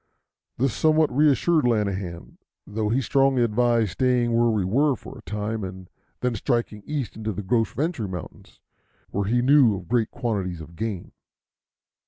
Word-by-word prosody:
This 130 -1 +1
somewhat 155 +1 +2
reassured 150 +2 +3
Lanahan, 95 - -2 0.3
though 105 +1 -2
he 125 +5 +1
strongly 135 0 +2
advised 115 -2 +2
staying 125 -1 +1
where 120 0 +3
we 105 -4 0
were 135 +8 +2
for - - -11
a - - -13
time, 105 +1 -3
and 95 -1 -8 0.3
then 125 -1 0
striking 115 -1 -1
east 145 -7 -3
into 110 0 -3
the 105 +1 -5
Gros 115 +4 +1
Ventre 145 - -2
Mountains, 90 -3 -9 0.5
where 100 0 -1
he 120 +4 +1
knew 135 -5 +5
of 90 -2 -10
great 120 -2 +1
quantities 100 -8 -3
of 80 +1 -11
game. 105 -2 -4
115 Hz, 160 wpm, -24 LUFS, 100-130 Hz, 0.5 s, knew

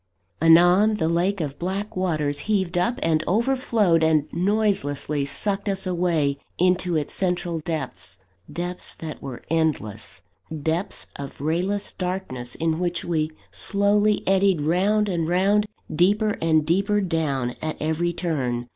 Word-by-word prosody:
Anon, 175 +6 +6
the 160 -6 0
lake 180 +4 +1
of 145 -2 -4
black 195 +4 -3
waters 155 -6 0
heaved 190 -5 +1
up 235 +9 +1
and 155 -1 +2
overflowed, 225 -5 +2
and 160 -2 +3
noiselessly 175 -7 0
sucked 200 +7 -2
us 195 0 -2
away 170 -6 0 0.2
into 180 -1 +2
its 150 -2 -1
central 175 -3 0
depths 150 - -4 0.3
depths 175 +1 -3
that 160 -2 -7
were 130 -3 -7
endless; 155 -11 -2 0.4
depths 165 +5 +1
of 140 -1 -8
rayless 180 +7 -1
darkness, 180 -10 -4
in 160 0 -1
which 175 -1 -2
we 155 -3 0 0.2
slowly 205 +1 +1
eddied 190 -3 +3
round 195 +7 +2
and 170 -4 -1
round, 200 +4 +2 0.3
deeper 205 +5 +3
and 160 -2 +3
deeper 195 +6 +2
down 155 -9 -1
at 155 0 -3
every 160 +3 0
turn. 130 -9 -2
175 Hz, 135 wpm, -24 LUFS, 155-195 Hz, 0.4 s, Anon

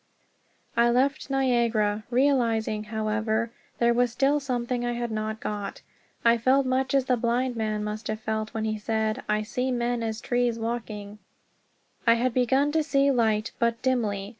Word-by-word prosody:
I 235 0 +4
left 275 +5 +1
Niagara, 235 -6 +1
realizing, 235 -5 +1
however, 220 +1 -1 0.3
there 235 0 +3
was 245 0 +2
still 275 +4 +2
something 245 -2 -2
I 240 0 -1
had 240 -1 -3
not 215 0 -3
got. 205 -3 -5 0.4
I 235 0 +5
felt 260 +3 +3
much 260 +1 0
as 270 -2 +3
the 255 - +2
blind 240 +2 0
man 215 -2 -1
must 210 +1 -4
have 215 0 -3
felt 220 0 -3
when 220 -1 -3
he 215 -1 -2
said, 220 0 -1
"I 210 0 +1
see 250 +4 -2
men 240 -1 -1
as 220 -1 -3
trees, 245 -1 0
walking" 225 -3 -4
(A. - - -11
V.). - - -14 0.9
I 230 - +8
had 245 +1 0
begun 265 +4 +2
to 320 +1 +2
see 280 -2 +2
light, 220 -3 +1
but 235 -1 +1
dimly. 210 -6 0
235 Hz, 175 wpm, -26 LUFS, 220-255 Hz, 0.9 s, I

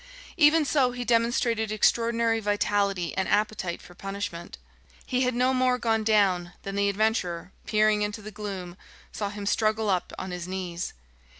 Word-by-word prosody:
Even 310 -1 +5
so, 260 -2 +2
he 245 0 -4
demonstrated 230 -2 +1
extraordinary 230 +1 +2
vitality 205 -3 0
and 190 - -1
appetite 205 -4 0
for 175 - -14
punishment. 195 - -6 0.5
He 255 0 0
had 250 -1 +1
no 255 +2 +2
more 255 -1 +2
gone 225 -2 +1
down 195 -5 +2
than 195 - -5
the 200 0 +2
adventurer, 195 -4 -1 0.2
peering 215 -1 +3
into 210 +1 -3
the 215 - -7
gloom, 190 -4 -6 0.3
saw 205 -2 -3
him 205 0 -6
struggle 215 0 +1
up 180 -2 -1
on 190 - -5
his 180 -1 -5
knees. 180 -2 -4
210 Hz, 160 wpm, -27 LUFS, 190-230 Hz, 0.5 s, Even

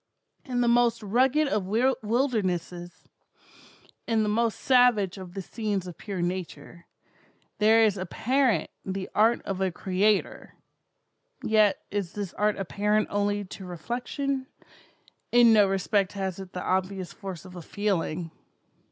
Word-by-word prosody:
In 245 -2 -1
the 240 - +2
most 235 -1 +3
rugged 260 +8 +2
of 210 -7 -1
wildernesses—in 215 -7 0 1.3
the - - -1
most 225 +1 0
savage 240 -7 +3
of 185 -1 -10
the 195 - -4
scenes 205 -2 -3
of 180 -2 -8
pure 195 -4 -4
Nature—there 185 +5 -2
is 205 -3 +2
apparent 245 +7 0
the 190 0 -4
art 225 +3 +3
of 195 -1 -4
a 190 - +2
Creator; 195 +4 0 0.9
yet 215 -2 +3
is 200 -4 -3
this 200 -3 -5
art 210 0 0
apparent 210 +2 0
only 205 0 0
to 190 +1 -10
reflection; 250 - -4 0.8
in 240 -1 +6
no 210 -2 +6
respect 195 0 0
has 190 -2 -4
it 190 -2 -9
the 180 - -4
obvious 185 0 -2
force 190 -3 -8
of 185 -1 -12
a 175 - -7
feeling. 175 -4 -2
205 Hz, 130 wpm, -27 LUFS, 185-230 Hz, 1.3 s, in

